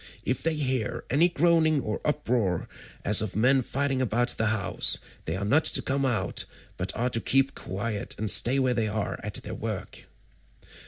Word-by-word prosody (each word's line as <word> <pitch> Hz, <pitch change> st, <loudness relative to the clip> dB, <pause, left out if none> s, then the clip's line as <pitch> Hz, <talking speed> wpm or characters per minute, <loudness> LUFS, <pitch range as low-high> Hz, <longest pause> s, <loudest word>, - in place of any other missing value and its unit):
If 130 Hz, -, -1 dB
they 165 Hz, -1 st, 0 dB
hear 130 Hz, -7 st, -2 dB
any 160 Hz, +7 st, +5 dB
groaning 165 Hz, -2 st, +3 dB
or 105 Hz, -4 st, -4 dB
uproar 120 Hz, -, -1 dB, 0.4 s
as 105 Hz, +1 st, +5 dB
of 110 Hz, -3 st, -4 dB
men 130 Hz, +5 st, +3 dB
fighting 135 Hz, +1 st, -1 dB
about 120 Hz, 0 st, 0 dB
the 110 Hz, -, +1 dB
house, 110 Hz, -3 st, +2 dB, 0.3 s
they 80 Hz, -, -2 dB
are 100 Hz, +2 st, -3 dB
not 145 Hz, +9 st, +3 dB
to -, -, +2 dB
come 135 Hz, 0 st, 0 dB
out, 120 Hz, -4 st, 0 dB, 0.3 s
but 95 Hz, +1 st, -1 dB
are 125 Hz, +2 st, -1 dB
to 115 Hz, -, +1 dB
keep 135 Hz, +1 st, +2 dB
quiet 100 Hz, +2 st, -4 dB
and 110 Hz, -1 st, +3 dB
stay 130 Hz, +3 st, +4 dB
where 130 Hz, -2 st, +2 dB
they 115 Hz, -2 st, 0 dB
are 105 Hz, -1 st, -3 dB
at -, -, -6 dB
their -, -, -5 dB
work." -, -, -6 dB
125 Hz, 180 wpm, -27 LUFS, 110-140 Hz, 0.4 s, any